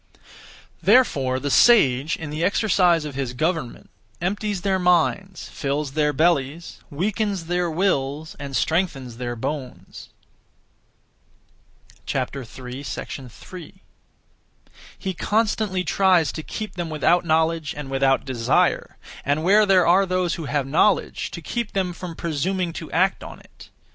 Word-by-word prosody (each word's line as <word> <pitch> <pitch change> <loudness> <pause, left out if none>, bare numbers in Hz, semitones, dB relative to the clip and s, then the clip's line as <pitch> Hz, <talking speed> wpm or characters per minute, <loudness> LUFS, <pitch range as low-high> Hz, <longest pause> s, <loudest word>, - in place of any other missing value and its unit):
Therefore 140 - +3
the 145 +1 -3
sage, 150 - +5
in 160 -2 -7
the 155 +2 -3
exercise 180 -4 +3
of 150 - -6
his 130 -2 -3
government, 155 -1 -3 0.3
empties 205 +2 -2
their 190 0 +1
minds, 180 +2 +1
fills 140 0 -3
their 150 +1 +1
bellies, 155 +1 0
weakens 200 +3 -2
their 175 +1 0
wills, 155 -4 -1
and 140 -1 -6
strengthens 140 -9 -1
their 120 -1 -4
bones. 130 +2 -6 2.0
3. 135 - -6 1.2
He 190 -1 -4
constantly 210 -1 0
(tries 180 -6 +3
to) 160 - -6
keep 215 +6 -6
them 175 -2 -4
without 165 +3 +2
knowledge 160 -1 +1
and 140 -2 -6
without 135 0 +2
desire, 120 -4 +1 0.3
and 145 +3 0
where 205 +4 +5
there 185 -3 +5
are 190 +3 +4
those 185 -1 0
who 165 - -5
have 145 -1 -1
knowledge, 145 +6 +1
to - - -8
keep 235 -3 -3
them 185 -2 -1
from 170 -1 -7
presuming 170 +3 -2
to 160 - -7
act 190 +3 +1
(on - - -10
it). - - -17
165 Hz, 130 wpm, -23 LUFS, 140-185 Hz, 2.0 s, sage